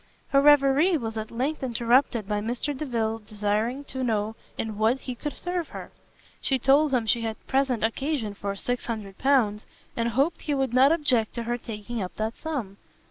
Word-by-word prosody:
Her 275 -1 +4
reverie 290 +4 +5
was 225 -4 -4
at 220 0 -4
length 270 +7 -2
interrupted 240 -2 +2
by 210 0 0
Mr 245 +6 -2
Delvile's 230 -6 -2
desiring 210 +5 -1
to 260 -2 -5
know 220 -2 0 0.2
in 215 -2 -4
what 230 +5 +2
he 255 - -4
could 295 +4 -6
serve 355 -2 -2
her. - - -9 0.5
She 270 - +2
told 275 +4 +4
him 245 -4 +1
she 230 +2 +2
had 225 -1 -3
present 265 -4 +1
occasion 230 -1 -1
for 200 0 -4
L600, 225 0 0 0.3
and 235 0 0
hoped 275 +8 +1
he 295 - -1
would 265 -3 0
not 265 +3 +6
object 275 -9 +1
to 235 - -3
her 240 +1 -2
taking 225 0 -5
up 185 - -5
that 220 +1 -2
sum. 255 -12 -4
240 Hz, 180 wpm, -26 LUFS, 220-275 Hz, 0.5 s, not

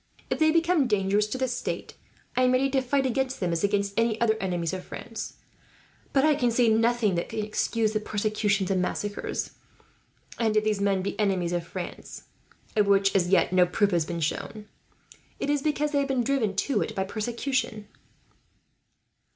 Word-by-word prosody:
If - - 0
they 315 0 +5
become 330 -3 +3
dangerous 205 -1 +2
to 235 - -4
the 260 0 0
state, 245 0 -4 0.4
I 255 - +2
am 255 0 +4
ready 270 +1 +2
to 265 -1 +2
fight 270 +1 0
against 265 +1 -1
them, 180 -3 -1
as 165 +2 -1
against 200 0 +1
any 225 0 +1
other 220 -2 +3
enemies 175 -3 -1
of 185 -1 -4
France; 225 -1 -7 0.8
but 275 +1 +3
I 310 - +5
can 260 -4 +1
see 235 0 +3
nothing 225 -1 +2
that 170 0 -2
can 220 -1 -3
excuse 215 +1 0
the 215 - 0
persecutions 210 -2 0
and 185 -1 +2
massacres. 205 +3 -3 0.9
And 220 -2 +2
if 215 - +3
these 215 -2 0
men 195 -2 +1
be 200 - -4
enemies 190 -4 +1
of 170 -1 -2
France, 185 -2 -7 0.5
of 210 -2 +3
which 195 0 +3
as 175 -2 +2
yet 185 -1 +3
no 180 -1 +5
proof 200 +3 +1
has 170 -3 +1
been 170 -1 -4
shown, 210 +7 -3 0.7
it 285 - 0
is 290 -1 +1
because 300 0 0
they 285 - +2
have 280 - 0
been 260 -3 +1
driven 235 -7 0
to 215 +3 0
it, - - -3
by 190 - 0
persecution." 230 +1 -2
215 Hz, 190 wpm, -26 LUFS, 195-255 Hz, 0.9 s, they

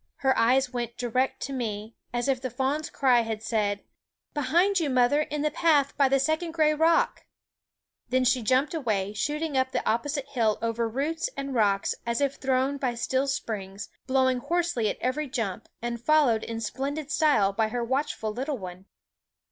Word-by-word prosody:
Her 265 -1 +1
eyes 255 +3 +3
went 240 -1 -4
direct 250 +2 -1
to 275 - -4
me, 220 -3 -4 0.2
as 240 +1 -1
if 265 -2 +1
the 260 - -3
fawn's 270 +5 -1
cry 255 -3 +3
had 220 -1 -4
said: 205 -3 -1 0.3
" - - -55
Behind 345 +8 +2
you, 315 -4 0
mother, 255 +3 +3
in 300 -1 -3
the 305 - +1
path 295 -3 +2
by 275 -2 +3
the 275 0 +3
second 315 +4 0
gray 310 -2 +3
rock! 325 +2 +2 0.4
" - - -54
Then 255 0 +2
she 250 0 +3
jumped 260 +7 +2
away, 210 -10 -1
shooting 295 +6 -2
up 260 0 +2
the - - -1
opposite 275 +5 -1
hill 230 -6 +1
over 230 0 -1
roots 315 - -2
and 275 -1 -4
rocks 200 -4 +2
as 235 0 -1
if 280 -1 0
thrown 265 +1 0
by 255 -3 -1
steel 260 +3 0
springs, 205 -7 -4 0.2
blow 260 0 +3
ing 255 -1 +1
hoarsely 335 -7 0
at - - -3
every 290 +4 -1
jump, 225 -8 -3
and 235 -1 -3
followed 260 -5 +3
in 230 0 -5
splendid 280 +6 -3
style 290 -12 +3
by 220 +2 +1
her 240 +2 -2
watchful 250 -4 -2
little 270 +4 -3
one. 185 -2 -9
260 Hz, 190 wpm, -27 LUFS, 230-290 Hz, 0.4 s, eyes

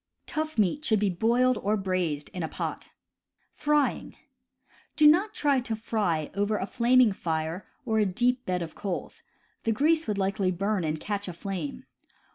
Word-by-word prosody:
Tough 310 -2 -3
meat 215 - +1
should 220 -8 +2
be 200 -2 +1
boiled 240 +6 +2
or 210 +2 +1
braised 180 -7 -1
in 180 - -6
a 160 - -1
pot. - - -5 0.7
Do 300 +1 -2
not 365 +8 +5
try 285 -3 +2
to 235 -3 -3
fry 205 -9 -1
over 205 +2 0
a 190 - -2
flaming 245 +1 +4
fire 165 +1 -3 0.2
or 220 -2 +1
a 210 - +4
deep 250 +6 +1
bed 180 -1 0
of 165 - -8
coals; 195 -3 -5 0.4
the 225 - 0
grease 315 +7 +2
would 210 -2 -1
likely 195 0 0
burn 195 +1 0
and 155 0 -1
catch 205 +1 -3
aflame. 175 -3 -5
210 Hz, 160 wpm, -27 LUFS, 180-250 Hz, 0.7 s, not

